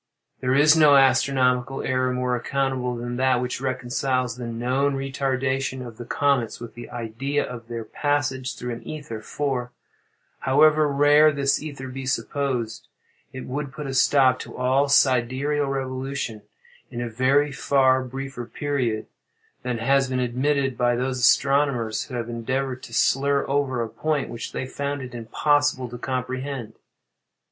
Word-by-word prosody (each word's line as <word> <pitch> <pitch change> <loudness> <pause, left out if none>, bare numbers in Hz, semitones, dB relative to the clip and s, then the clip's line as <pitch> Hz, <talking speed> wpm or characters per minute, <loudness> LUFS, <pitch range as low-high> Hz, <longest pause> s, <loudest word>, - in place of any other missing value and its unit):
There 130 0 +1
is 150 +3 +6
no 150 -3 +6
astronomical 130 -1 +2
error 130 0 0
more 125 0 -1
unaccountable 130 0 -1
than 120 +1 -4
that 130 -1 +3
which 125 0 -3
reconciles 130 -1 -1
the 125 -1 -6
known 130 +4 0
retardation 130 -1 -2
of 115 -2 -10
the 120 - -7
comets 140 -5 0
with 120 - -9
the 120 0 -10
idea 125 +5 -2
of 120 -2 -8
their 115 -1 -5
passage 145 +1 -1
through 125 0 -4
an 115 - -8
ether: 140 -8 -7
for, 125 -1 -3 0.7
however 150 +3 +4
rare 145 +2 +5
this 140 -1 +1
ether 140 -3 -7
be 130 0 -6
supposed, 130 -5 -2 0.4
it 130 - -7
would 140 +1 -4
put 145 +2 -7
a 135 - -4
stop 130 -1 +4
to - - -9
all 130 +3 +2
sidereal 140 +2 +2
revolution 130 -3 -3 0.5
in 120 - -6
a 120 - -2
very 130 +5 +2
far 130 -2 +3
briefer 130 -1 -6
period 125 -6 -2 0.6
than 125 -1 -2
has 135 +3 +2
been 130 -1 -1
admitted 130 +2 0
by 120 -1 +3
those 130 +1 -2
astronomers 125 -2 +2
who 130 - -8
have 120 -1 -3
endeavored 130 +2 -3
to 125 - -11
slur 140 +4 +2
over 135 -3 0
a - - -4
point 150 +4 -2
which 115 - -6
they - - -3
found 140 +1 -4
it 125 - -9
impossible 130 +3 +1
to 120 0 -9
comprehend. 130 -2 -4
130 Hz, 155 wpm, -24 LUFS, 125-140 Hz, 0.7 s, is